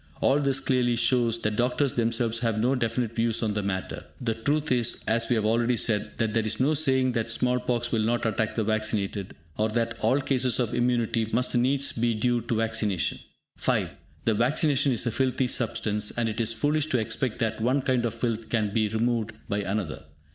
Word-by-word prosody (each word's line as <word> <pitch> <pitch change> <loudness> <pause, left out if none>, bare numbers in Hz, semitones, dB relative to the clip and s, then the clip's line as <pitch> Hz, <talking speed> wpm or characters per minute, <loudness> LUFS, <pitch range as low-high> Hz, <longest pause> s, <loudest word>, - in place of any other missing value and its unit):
All 140 +2 +3
this 135 -2 +1
clearly 125 -2 +1
shows 120 -1 +2
that 105 0 -1
doctors 125 +2 +1
themselves 115 0 0
have 115 -3 0
no 125 +4 +2
definite 115 -2 -1
views 115 0 +1
on 110 -2 0
the 105 - -1
matter. 95 -2 -4
The 115 -3 -1
truth 145 +6 -1
is, 120 -2 +1
as 115 +1 +1
we 120 - +3
have 110 -2 0
already 115 +2 +2
said, 105 -3 0
that 110 -2 0
there 115 0 +1
is 110 0 -1
no 140 +4 +3
saying 130 -4 +2
that 115 -2 -2
small 125 +2 +1
pox 120 -1 -2
will 115 - +1
not 120 +2 0
attack 110 0 -1
the 110 - 0
vaccinated, 105 -2 -2 0.2
or 110 +1 +2
that 115 +1 -2
all 135 - +2
cases 130 -2 +1
of 120 -3 0
immunity 120 -2 0
must 125 +3 +1
needs 135 +3 +2
be 115 0 0
due 120 +2 +1
to 115 +1 -2
vaccination. 110 -8 0 0.4
(5) - - 0 0.3
The 115 - +3
vaccine 130 +8 +2
is 135 -4 +1
a 120 - 0
filthy 130 +2 0
substance, 105 -4 -1
and 120 -1 -1
it 110 +1 -2
is 115 0 +1
foolish 145 +6 0
to 130 - +1
expect 115 +1 -1
that 110 -1 -2
one 130 +4 +1
kind 130 -2 +1
of 115 -1 -2
filth 115 -1 -3
can 105 -3 0
be 110 -1 +2
removed 115 0 -1
by 100 - -1
another. 100 -5 -3
115 Hz, 205 wpm, -26 LUFS, 110-125 Hz, 0.4 s, All